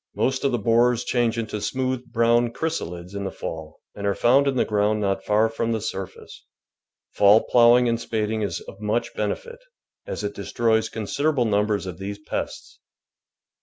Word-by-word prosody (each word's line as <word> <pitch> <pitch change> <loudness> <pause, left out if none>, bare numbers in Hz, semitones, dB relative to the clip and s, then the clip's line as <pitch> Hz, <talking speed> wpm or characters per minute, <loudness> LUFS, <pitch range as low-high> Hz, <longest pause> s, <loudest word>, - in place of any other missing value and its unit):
IMost 130 0 0
of 140 - +2
the 120 - +1
borers 115 +2 +2
change 120 -2 0
into 110 -2 -3
smooth, 130 +3 -2
brown 115 +1 +3
chrysalids 90 - -4
in 100 0 -4
the 95 - -2
fall, 80 -3 -7
and 100 0 -4
are 100 - +1
found 135 +4 +4
in 135 - +1
the - - +2
ground 105 0 +1
not 95 -2 -1
far 105 +1 +3
from 115 +1 -2
the 110 - -1
surface. 95 -2 -7 0.7
Fall 105 +2 +5
ploughing 120 0 +5
and 115 0 0
spading 110 0 -2
is 100 -5 -2
of 100 - -12
much 105 +3 -1
benefit, 475 -1 -4 0.5
as - - -4
it 105 0 -3
de 100 - -8
stroys 110 +2 +1
considerable 135 +5 0
numbers 105 -1 +1
of 90 -2 -7
these 100 +1 -5
pests. 105 - -6
110 Hz, 175 wpm, -24 LUFS, 100-120 Hz, 0.7 s, Fall